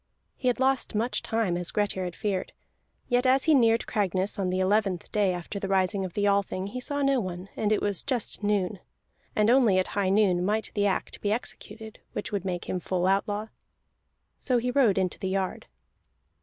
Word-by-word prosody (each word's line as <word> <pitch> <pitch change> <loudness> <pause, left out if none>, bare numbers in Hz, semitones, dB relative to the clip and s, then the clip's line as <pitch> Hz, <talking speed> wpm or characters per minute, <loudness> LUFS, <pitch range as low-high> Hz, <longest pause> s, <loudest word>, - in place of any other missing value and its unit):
He 255 - -3
had 250 0 +2
lost 265 -3 +1
much 230 +4 0
time, 225 -6 0
as 175 -1 -2
Grettir 205 -3 -1
had 175 -1 -5
feared; 195 -3 -2 0.5
yet 245 +1 +2
as 265 +1 +4
he 320 - +4
neared 230 -4 +4
Cragness 195 -2 -1
on 190 -2 0
the 185 +1 -1
eleventh 190 -2 +1
day 205 -3 +2
after 180 +3 -5
the 195 - -3
rising 195 +1 +1
of 185 -2 -5
the 205 - +1
Althing 200 -2 +1
he 255 - -5
saw 285 +3 -2
no 275 -1 +3
one, 185 -2 -5
and 210 -1 0
it 215 - +1
was 200 -3 0
just 250 -7 -2
noon. 205 -2 0 0.6
And 210 0 +3
only 240 -7 +5
at 185 - +1
high 200 -2 0
noon 190 -3 +3
might 210 +3 -1
the 205 -1 +2
act 190 - -2
be 205 - 0
executed 220 -1 -5
which - - -4
would 200 -2 -2
make 180 -2 -3
him 185 - -2
full 180 0 -1
outlaw. 205 +3 0 0.9
So 255 -2 +1
he 250 +1 0
rode 245 -8 +3
into 185 -2 0
the 190 - -2
yard. 190 -1 -2
205 Hz, 200 wpm, -27 LUFS, 185-225 Hz, 0.9 s, only